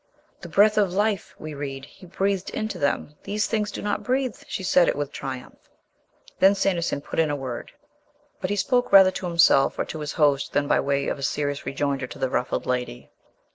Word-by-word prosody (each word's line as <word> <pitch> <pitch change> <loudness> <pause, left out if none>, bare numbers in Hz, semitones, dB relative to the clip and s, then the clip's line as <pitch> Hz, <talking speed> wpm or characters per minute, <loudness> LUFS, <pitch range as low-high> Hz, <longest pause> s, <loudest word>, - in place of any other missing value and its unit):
"The 175 - -10
'_ - - -18
breath_ 210 +3 +5
of 195 -3 0
life,' 205 -1 -1
we 155 0 -7
read, 140 -2 -6
'He 185 - -16
breathed 190 +1 -1
into 215 0 -4
them. 145 +1 -1
These 210 +1 -1
things 215 -2 -1
do - - -6
not 205 0 -1
breathe." 255 -2 -1
She 190 - -4
said 180 -1 +4
it - - +1
with 145 -1 -3
triumph. 130 -1 -8 0.7
Then 195 +1 +6
Sanderson 175 -7 0
put - - -5
in 160 -2 +3
a 145 - 0
word. 130 -4 -6 0.7
But 185 - -3
he 205 - 0
spoke 245 +5 +1
rather 190 -1 +8
to 185 - -5
himself 170 -5 +4
or - - -1
to 160 - -7
his 150 -1 -4
host 145 -4 +2
than 145 0 +1
by - - +3
way 140 0 0
of 140 - -3
serious 145 0 -2
rejoinder 135 -1 -1
to - - -10
the 130 - -2
ruffled 125 - -1
lady. 125 - -3
165 Hz, 210 wpm, -24 LUFS, 140-200 Hz, 0.7 s, rather